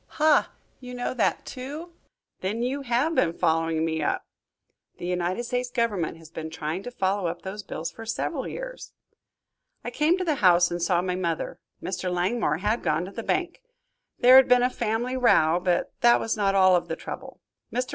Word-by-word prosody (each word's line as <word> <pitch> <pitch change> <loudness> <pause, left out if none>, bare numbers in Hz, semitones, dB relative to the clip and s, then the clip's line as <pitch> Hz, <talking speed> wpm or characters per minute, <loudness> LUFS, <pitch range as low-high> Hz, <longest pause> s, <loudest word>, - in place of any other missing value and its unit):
"Ha! 305 -1 +4 0.3
You 250 -1 -9
know 245 0 -2
that, 240 -5 0
too! 295 +7 -7 0.5
Then 210 +5 -2
you 270 +3 -2
have 260 +5 +1
been 165 - +2
following 165 0 +1
me 160 -1 -1
up?" 150 - -1 0.7
"The - - -7
United 180 +4 -1
States 245 +1 -2
Government 220 -10 -1
has 165 -1 -15
been 160 -1 -6
trying 160 +2 -4
to 245 - -6
follow 195 -5 -1
up 170 +1 -5
those 195 +2 -5
bills 165 -4 -5
for 225 - -10
several 225 0 -3
years." - - -7 0.9
"I - - -5
came 315 +4 +2
to 370 - -2
the 310 -4 +1
house 175 -2 +5
and 175 0 -3
saw 175 0 +2
my 180 -1 -1
mother. 170 -3 -3 0.2
Mr. 185 -1 -3
Langmore 180 -2 0
had 210 +6 -1
gone 155 +3 0
to 190 - -9
the 230 - -6
bank. 355 - -2 0.6
There 255 +1 +8
had 265 - +7
been 250 0 +5
a 250 - +2
family 235 +2 -2
row, 175 -9 +4
but 180 -1 0
that 240 0 +6
was 225 - -1
not 200 -2 +1
all 185 -1 +6
of 175 - 0
the - - -3
trouble. - - -8 0.3
Mr. 250 +1 -2
205 Hz, 195 wpm, -26 LUFS, 175-250 Hz, 0.9 s, There